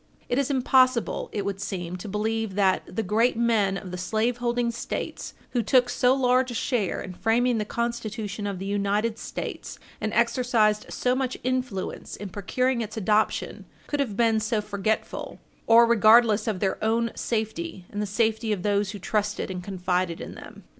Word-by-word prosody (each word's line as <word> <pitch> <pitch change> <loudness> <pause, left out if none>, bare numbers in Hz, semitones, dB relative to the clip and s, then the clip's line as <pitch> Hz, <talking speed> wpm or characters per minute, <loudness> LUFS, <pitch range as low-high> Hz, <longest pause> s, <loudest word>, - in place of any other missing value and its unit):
It 245 - +1
is 280 - 0
impossible, 255 -2 +2
it 205 -2 -3
would 195 -1 -3
seem, 180 -3 -4
to 190 +3 -7
believe 215 0 -1
that 195 -2 +3
the 210 +5 -3
great 225 +5 +2
men 220 -5 +2
of 185 -2 -8
the 180 - -5
slaveholding 235 +4 0
States, 235 - -5 0.2
who 245 - +1
took 245 +2 +3
so 250 +1 +3
large 255 -1 +3
a 240 - -5
share 225 -6 -1
in 185 - -7
framing 230 +4 +1
the 210 - -1
Constitution 220 -3 -3
of 200 -2 -3
the 190 - -6
United 205 +3 0
States - - -6 0.2
and 215 - -1
exercised 235 -3 +2
so 250 - 0
much 260 -1 -1
influence 255 -6 -3
in 205 -1 -7
procuring 240 +6 0
its 220 0 -5
adoption, 215 +1 0 0.2
could 290 - -3
have 230 -8 -1
been 225 -2 +3
so 220 0 0
forgetful 210 +1 -3 0.3
or 230 +1 +8
regardless 225 -1 +5
of 205 -5 -1
their 195 +1 -1
own 230 +1 +1
safety 220 - -3
and 205 - -3
the 210 - -2
safety 220 +1 0
of 195 -4 -1
those 205 -1 +1
who - - -5
trusted 210 0 -1
and 180 -1 -5
confided 180 -2 -1
in - - -7
them. - - -12
220 Hz, 175 wpm, -26 LUFS, 200-240 Hz, 0.3 s, or